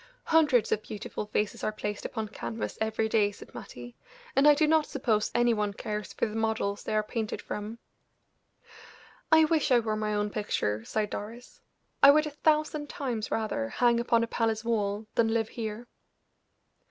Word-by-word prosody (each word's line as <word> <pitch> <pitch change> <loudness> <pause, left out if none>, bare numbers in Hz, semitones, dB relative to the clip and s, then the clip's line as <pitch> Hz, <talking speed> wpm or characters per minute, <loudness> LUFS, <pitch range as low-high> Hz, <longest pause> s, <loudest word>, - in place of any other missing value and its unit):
"Hundreds 300 -8 +3
of 215 - +1
beautiful 210 0 -6
faces 210 0 -2
are - - 0
placed 210 -1 -5
upon 220 -2 -3
canvas 220 +1 -5
every 220 0 0
day," 215 -2 +2
said - - -14
Mattie; 120 0 -9 0.4
"and 275 +2 +5
I 295 - +8
do 310 +2 +3
not 310 0 +3
suppose 225 -6 0
any 240 0 +4
one 210 -2 -1
cares 210 0 -5
for - - -1
the 215 - -5
models 220 -2 -1
they 215 - -2
are 215 - +2
painted 220 0 -3
from." 210 +2 -6 1.5
"I 320 0 +7
wish 310 -2 +1
I 250 - +7
were 220 -2 -1
my 215 0 -1
own 205 0 -1
picture," 110 - -1
sighed 210 - -2
Doris. 230 +4 -8 0.4
"I 280 - +9
would 305 +2 +6
a 300 - -4
thousand 300 0 0
times 250 -10 -3
rather 215 - -2
hang 240 - +2
upon 235 -1 +2
a - - -1
palace 225 -1 -1
wall 210 -2 -1
than 230 - +3
live 225 -1 0
here." 220 0 -5
220 Hz, 175 wpm, -28 LUFS, 210-245 Hz, 1.5 s, I